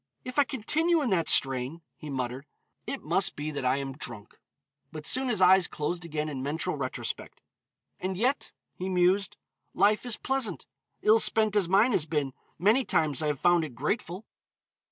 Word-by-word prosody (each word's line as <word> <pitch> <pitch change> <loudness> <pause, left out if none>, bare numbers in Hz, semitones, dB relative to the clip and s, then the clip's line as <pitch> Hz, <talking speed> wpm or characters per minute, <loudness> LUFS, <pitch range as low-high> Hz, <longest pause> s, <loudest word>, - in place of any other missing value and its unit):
"If 255 +3 -2
I 285 - +5
continue 320 +8 +1
in 245 - -1
that 170 -4 +2
strain," 135 +5 +2
he 155 - -10
muttered, 130 +1 -4 0.4
"it 275 - -5
must 175 +5 +1
be 150 +1 -4
that 145 -3 -4
I 130 +1 +2
am 135 -1 -4
drunk." 115 -6 -9 0.5
But 155 -1 -8
soon 260 +1 +1
his 215 -5 +1
eyes 185 -1 +6
closed 170 +4 -3
again 155 -2 -3
in 140 -4 -5
mental 145 +4 -2
retrospect. - - -5 0.6
"And 185 0 -3
yet," 255 +7 0 0.2
he 185 +1 -5
mused, 185 +1 +2 0.4
"life 205 +3 +3
is 245 -3 -3
pleasant; 265 -9 -2 0.4
ill 220 +1 +5
spent 215 -1 +2
as 195 -5 +2
mine 200 +7 +4
has 160 -7 0
been, 145 -4 -1 0.2
many 215 +10 +3
times 155 - +2
I 155 - 0
have 145 -3 -1
found 175 -1 +3
it 145 -6 -7
grateful. 180 - -3
175 Hz, 175 wpm, -28 LUFS, 150-215 Hz, 0.6 s, eyes